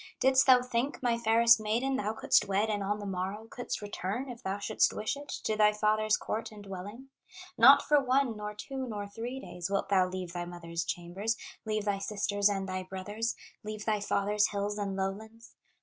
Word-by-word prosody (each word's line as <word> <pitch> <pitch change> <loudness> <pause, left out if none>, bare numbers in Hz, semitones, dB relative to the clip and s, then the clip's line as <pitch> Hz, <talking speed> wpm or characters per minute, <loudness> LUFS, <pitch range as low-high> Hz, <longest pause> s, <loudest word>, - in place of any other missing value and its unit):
"Didst 265 +1 +4
thou 250 -1 +7
think, 250 +3 -2
my 240 -1 +2
fairest 230 0 +5
maiden, 235 +6 0
Thou 215 -4 -1
couldst 220 - +3
wed 200 +3 +1
and 205 -1 -1
on 205 +1 -1
the 205 - -7
morrow 195 +3 -3
Couldst 245 -2 -5
return, 205 +5 -4
if 240 0 -10
thou 195 -3 -2
shouldst 210 +1 +2
wish 215 - -2
it, 285 +1 -10
To 215 - 0
thy 210 0 +5
father's 215 0 +2
court 225 +1 -4
and 210 -1 -11
dwelling? 205 +7 -8 0.5
Not 270 +5 +8
for 295 -1 +4
one, 260 -2 +2
nor 210 0 -6
two, 265 +4 -5
nor 205 -3 -4
three 235 +5 -6
days, 180 -9 -6
Wilt 195 0 -1
thou 190 -2 +4
leave 180 -2 -5
thy 175 -1 -3
mother's 170 -1 -5
chambers, 190 +8 -2 0.3
Leave 215 -1 -1
thy 200 -1 0
sisters 205 0 +1
and 195 -1 -2
thy 185 0 -3
brothers, 205 +5 -4 0.3
Leave 215 0 -6
thy 215 -1 +1
father's 205 +1 +1
hills 205 0 -3
and 200 -1 -2
lowlands. 220 +4 -5
210 Hz, 195 wpm, -30 LUFS, 195-230 Hz, 0.5 s, Not